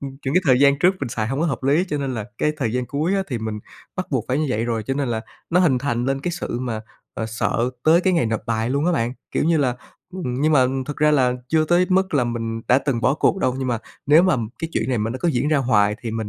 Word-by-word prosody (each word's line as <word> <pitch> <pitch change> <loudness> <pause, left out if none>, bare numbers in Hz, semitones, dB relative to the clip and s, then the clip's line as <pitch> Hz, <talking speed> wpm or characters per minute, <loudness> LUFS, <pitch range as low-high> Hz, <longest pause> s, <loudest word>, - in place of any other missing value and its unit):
ừm, 140 -1 -5
những 135 - -1
cái 180 - +5
thời 130 0 +4
gian 140 0 +5
trước 180 +4 +4
mình 135 - -2
xài 110 -1 -2
hông 135 +3 -2
có 170 - +2
hợp 135 -3 -3
lý 145 +7 +3
cho 150 - -2
nên 135 -2 -2
là 110 -3 -4
cái 150 - +1
thời 115 -6 -1
gian 125 -1 -1
cuối 155 +9 -1
á, 195 - +1
thì 125 - -2
mình 110 -1 -4 0.4
bắt 185 - -2
buộc 130 -6 0
phải 130 - +1
như 155 - 0
vậy 115 -1 -1
rồi, 115 -2 -1
cho 135 - -2
nên 140 -2 -1
là 110 -1 -1 0.3
nó 180 +2 +4
hình 140 -8 +3
thành 125 -3 -1
lên 135 0 -1
cái 175 - -2
sự 120 -7 -4
mà, 115 -4 -3 0.3
à, 110 - -3
sợ 115 +2 -1
tới 165 +2 +5
cái 185 0 +2
ngày 165 -9 +2
nộp 110 0 -1
bài 115 +1 -1
luôn 140 +4 0
á 180 - +3
bạn. 120 -5 0 0.2
Kiểu - - 0
như 165 0 +3
là, 125 -4 +1 0.4
ừm, 145 -10 -3
nhưng 155 +1 +3
mà 130 -3 +5 0.2
thực 145 - -5
ra 150 0 +3
là 130 -4 +3 0.2
chưa 160 -1 +3
tới 175 +3 +3
mức 190 -2 +1
là 130 -4 +3
mình 115 -1 -3
đã 125 - +5
từng 135 -5 -1
bỏ 135 - +2
cuộc 180 - +1
đâu, 130 -8 +1
nhưng 130 -1 -2
mà 120 -2 0 0.3
nếu 155 +4 +6
mà 185 -7 +3 0.2
cái 165 0 -3
chuyện 110 - -1
này 125 -3 0
mà 110 +2 -1
nó 130 - -4
cứ 175 - +1
diễn 145 0 0
ra 155 - +3
hoài 105 -5 +2
thì 115 - -3
mình 110 -1 -3
135 Hz, 300 wpm, -22 LUFS, 120-155 Hz, 0.4 s, nếu